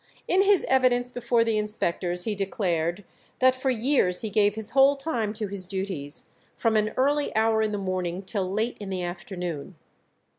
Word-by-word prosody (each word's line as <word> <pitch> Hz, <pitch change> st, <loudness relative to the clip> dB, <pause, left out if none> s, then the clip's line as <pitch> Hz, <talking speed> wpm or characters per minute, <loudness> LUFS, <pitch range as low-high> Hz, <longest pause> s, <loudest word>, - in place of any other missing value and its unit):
In 375 Hz, -, +4 dB
his 400 Hz, -1 st, +4 dB
evidence 250 Hz, -1 st, +3 dB
before 240 Hz, -1 st, +1 dB
the 225 Hz, -2 st, +1 dB
inspectors 180 Hz, -4 st, -1 dB
he 220 Hz, -, -1 dB
declared 190 Hz, -3 st, -1 dB, 0.3 s
that 260 Hz, 0 st, +5 dB
"for 260 Hz, +1 st, -2 dB
years 240 Hz, -7 st, +1 dB
he 220 Hz, -, -4 dB
gave 205 Hz, -1 st, +3 dB
his 220 Hz, -1 st, -3 dB
whole 275 Hz, +2 st, +5 dB
time 270 Hz, -7 st, -2 dB
to 215 Hz, 0 st, -2 dB
his 195 Hz, -2 st, -4 dB
duties, 190 Hz, -7 st, -4 dB, 0.2 s
from 225 Hz, -2 st, +1 dB
an 215 Hz, 0 st, +2 dB
early 285 Hz, +1 st, +1 dB
hour 220 Hz, 0 st, +3 dB
in 215 Hz, -1 st, 0 dB
the 205 Hz, -, -2 dB
morning 185 Hz, -1 st, -3 dB
till 190 Hz, -1 st, -2 dB
late 220 Hz, +4 st, -1 dB
in 205 Hz, -2 st, -6 dB
the 185 Hz, -2 st, -3 dB
afternoon. 175 Hz, -2 st, -5 dB
210 Hz, 180 wpm, -26 LUFS, 185-245 Hz, 0.3 s, that